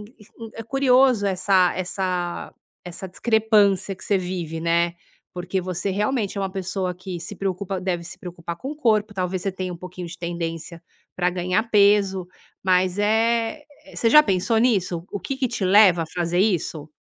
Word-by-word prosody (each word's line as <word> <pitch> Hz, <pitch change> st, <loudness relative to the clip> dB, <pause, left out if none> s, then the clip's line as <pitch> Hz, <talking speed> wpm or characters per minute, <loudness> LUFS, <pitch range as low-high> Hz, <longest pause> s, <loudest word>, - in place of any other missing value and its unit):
e -, -, -8 dB, 0.2 s
e 225 Hz, +1 st, -12 dB
é 225 Hz, -, -6 dB
curioso 255 Hz, -2 st, +3 dB
essa 185 Hz, -1 st, +3 dB
essa 180 Hz, -1 st, -3 dB, 0.3 s
essa 180 Hz, +2 st, -7 dB
discrepância 205 Hz, -2 st, +2 dB
que -, -, -12 dB
você 205 Hz, -, +2 dB
vive, 175 Hz, -3 st, -4 dB
né, 170 Hz, +1 st, +1 dB, 0.4 s
porque 180 Hz, +1 st, -2 dB
você 185 Hz, +2 st, -3 dB
realmente 210 Hz, +1 st, -1 dB
é -, -, -1 dB
uma 195 Hz, -, -1 dB
pessoa 190 Hz, -1 st, -3 dB
que 185 Hz, 0 st, -7 dB
se 170 Hz, +5 st, -7 dB
preocupa 190 Hz, 0 st, -3 dB
deve 180 Hz, -2 st, -2 dB
se 170 Hz, -, -9 dB
preocupar 170 Hz, -1 st, -7 dB
com 260 Hz, +9 st, -6 dB
o -, -, -11 dB
corpo, 215 Hz, -7 st, +1 dB
talvez 185 Hz, -1 st, -2 dB
você 195 Hz, -, -1 dB
tenha 185 Hz, -1 st, -4 dB
um -, -, -7 dB
pouquinho 180 Hz, 0 st, -8 dB
de 170 Hz, -, -9 dB
tendência 170 Hz, -1 st, -5 dB, 0.4 s
pra 180 Hz, 0 st, +2 dB
ganhar 180 Hz, +1 st, 0 dB
peso, 200 Hz, -3 st, +3 dB, 0.4 s
mas, 185 Hz, 0 st, +2 dB
eh 225 Hz, +5 st, +1 dB, 0.3 s
você 230 Hz, -, +2 dB
já 300 Hz, +3 st, +9 dB
pensou 200 Hz, 0 st, +1 dB
nisso, 190 Hz, -8 st, +1 dB
o -, -, -2 dB
que 275 Hz, -, -4 dB
que 265 Hz, -2 st, 0 dB
te 220 Hz, -4 st, -3 dB
leva 185 Hz, -3 st, +6 dB
a -, -, -5 dB
fazer 175 Hz, +1 st, -2 dB
isso? 170 Hz, -6 st, 0 dB
190 Hz, 180 wpm, -23 LUFS, 180-210 Hz, 0.4 s, já